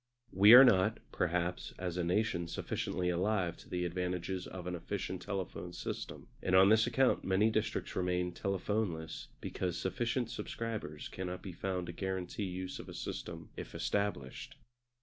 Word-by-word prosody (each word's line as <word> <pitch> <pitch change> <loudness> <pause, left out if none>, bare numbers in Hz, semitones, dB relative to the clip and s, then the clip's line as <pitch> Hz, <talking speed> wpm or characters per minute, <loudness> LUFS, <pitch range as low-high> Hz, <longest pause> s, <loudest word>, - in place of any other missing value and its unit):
We 100 +4 +8
are 130 - +12
not, 105 -3 +5
perhaps, 90 0 -1
as 90 -2 -3
a 90 - 0
nation 90 -1 +1
sufficiently 90 +1 -2
alive 90 -1 +1
to - - -15
the 90 0 -1
advantages 90 +1 -2
of 90 -2 -7
an 90 - -3
efficient 95 +1 -4
telephone 95 -3 -4
system; - - -5
and 95 - +2
on 95 +1 +8
this 110 +1 +5
account 130 +2 +3
many 100 +4 +3
districts 110 0 -1
remain 90 -1 0
telephoneless 95 -3 -2
because 90 -2 -2
sufficient 115 +4 -1
subscribers 115 -11 -4
cannot 90 -1 -5
be 95 - -5
found 90 0 -2
to 85 - -6
guarantee 95 +2 -3
use 95 0 -4
of - - -8
a - - -8
system - - -6
if - - -7
established. 100 -11 -2
95 Hz, 155 wpm, -34 LUFS, 90-105 Hz, -, are